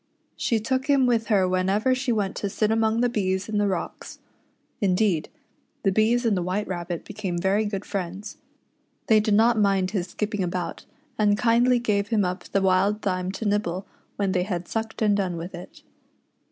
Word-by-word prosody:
She 230 - 0
took 260 +4 -1
him 280 -3 +4
with 230 -2 +1
her 195 -4 +3
whenever 190 +7 +1
she 255 0 -1
went 205 -4 -1
to 200 - -2
sit 215 +2 0
among 225 +1 +2
the 245 - +3
bees 190 -4 -1
in 215 -1 -1
the 205 - +2
rocks. 185 -3 -4 0.6
Indeed, 185 -4 +1 0.5
the 195 - +3
bees 225 +4 +2
and 220 -3 +3
the 180 - 0
White 185 +4 -2
Rabbit 175 -2 -4
became 195 -4 -4
very 195 +5 +1
good 205 -1 -4
friends. 195 +2 -5 0.7
They 220 -1 +5
did 210 -1 +2
not 225 +1 +4
mind 195 -2 +2
his 190 -4 -2
skipping 210 +2 -3
about, 180 0 -3 0.3
and 205 -1 +3
kindly 245 +2 +3
gave 210 -4 0
him 210 -3 +1
up 180 +1 -4
the 195 - 0
wild 195 +3 +2
thyme 185 -1 -1
to 220 - -5
nibble 200 -3 -1 0.3
when 200 -2 0
they 180 - +1
had 180 -2 -3
sucked 225 0 -3
and 205 -1 +3
done 185 -4 -1
with 170 +3 -7
it. 175 +1 -11
205 Hz, 190 wpm, -25 LUFS, 185-220 Hz, 0.7 s, They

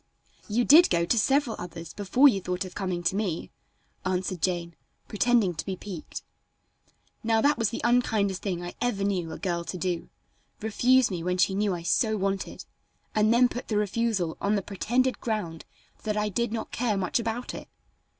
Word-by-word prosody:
"You 235 +3 +2
did 325 +5 +8
go 170 -1 +2
to 205 - +2
several 270 +1 +2
others 170 -2 -8
before 230 +8 +4
you 200 -8 +3
thought 180 +1 -2
of 185 - -9
coming 185 -3 -3
to 185 - +1
me," 195 -6 -2 0.5
answered 185 -1 -2
Jane, 170 -1 -1 0.3
pretending 220 -3 +2
to 155 - -4
be 190 - -3
piqued. 185 -4 -8 1.0
Now 225 0 +2
that 285 +4 +3
was 225 -3 +2
the - - -5
unkindest 220 -6 +2
thing 180 -4 -3
I 175 - -6
ever 240 -5 0
knew 185 -5 -1
a - - -6
girl 175 -3 -2
to 185 - -5
do 180 -1 -2 0.5
refuse 240 +3 +3
me 175 -3 -3
what 180 +1 0
she 190 - +3
knew 200 -1 +1
I 170 - -7
so 220 +5 +2
wanted, 195 0 -3 0.5
and 215 0 +3
then 245 +2 +5
put 245 0 -6
the 215 - 0
refusal 210 -4 0
on 205 +1 +2
the 200 - -1
pretended 245 +7 0
ground 195 -8 -3 0.4
that 215 -1 -2
I 210 0 +1
did 235 +3 -1
not 225 -1 -4
care 225 -4 0
much 185 +4 0
about 230 +2 -3
it. - - -8
200 Hz, 190 wpm, -27 LUFS, 180-230 Hz, 1.0 s, did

